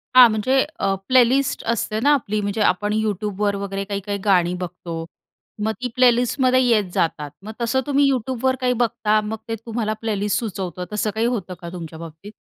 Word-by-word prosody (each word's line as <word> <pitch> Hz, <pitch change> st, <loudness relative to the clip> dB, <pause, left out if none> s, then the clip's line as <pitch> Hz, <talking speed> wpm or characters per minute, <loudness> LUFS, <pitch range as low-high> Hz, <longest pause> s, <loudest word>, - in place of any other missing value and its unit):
हां. 250 Hz, -2 st, +10 dB
म्हणजे 255 Hz, +5 st, +2 dB, 0.2 s
अ, 195 Hz, -, +1 dB
प्लेलिस्ट 260 Hz, +2 st, +3 dB
असते 215 Hz, -1 st, -2 dB
ना, 285 Hz, +5 st, +4 dB
आपली 215 Hz, -7 st, 0 dB
म्हणजे 205 Hz, +2 st, -2 dB
आपण 205 Hz, +2 st, +2 dB
YouTubeवर 210 Hz, -1 st, -1 dB
वगैरे 195 Hz, 0 st, -3 dB
काही-काही 200 Hz, 0 st, -3 dB
गाणी 180 Hz, -3 st, +3 dB
बघतो. 175 Hz, -2 st, -6 dB, 0.6 s
मग 220 Hz, -, +1 dB
ती 250 Hz, -, -1 dB
प्लेलिस्टमध्ये 255 Hz, +1 st, +3 dB
येत 215 Hz, -7 st, +2 dB
जातात. 150 Hz, -3 st, -1 dB
मग 215 Hz, -, -7 dB
तसं 265 Hz, +3 st, +1 dB
तुम्ही 285 Hz, 0 st, +3 dB
YouTubeवर 260 Hz, +1 st, 0 dB
काही 250 Hz, 0 st, +2 dB
बघता? 225 Hz, -2 st, +1 dB
मग 220 Hz, +1 st, -4 dB
ते 225 Hz, -, -2 dB
तुम्हाला 225 Hz, -2 st, -2 dB
प्लेलिस्ट 210 Hz, -2 st, 0 dB
सुचवतं, 185 Hz, -5 st, -4 dB
तसं 215 Hz, +1 st, 0 dB
काही 225 Hz, +1 st, +1 dB
होतं 200 Hz, -7 st, -3 dB
का 170 Hz, -, -6 dB
तुमच्या 165 Hz, -2 st, -8 dB
बाबतीत? 165 Hz, +5 st, -10 dB
215 Hz, 175 wpm, -22 LUFS, 195-245 Hz, 0.6 s, हां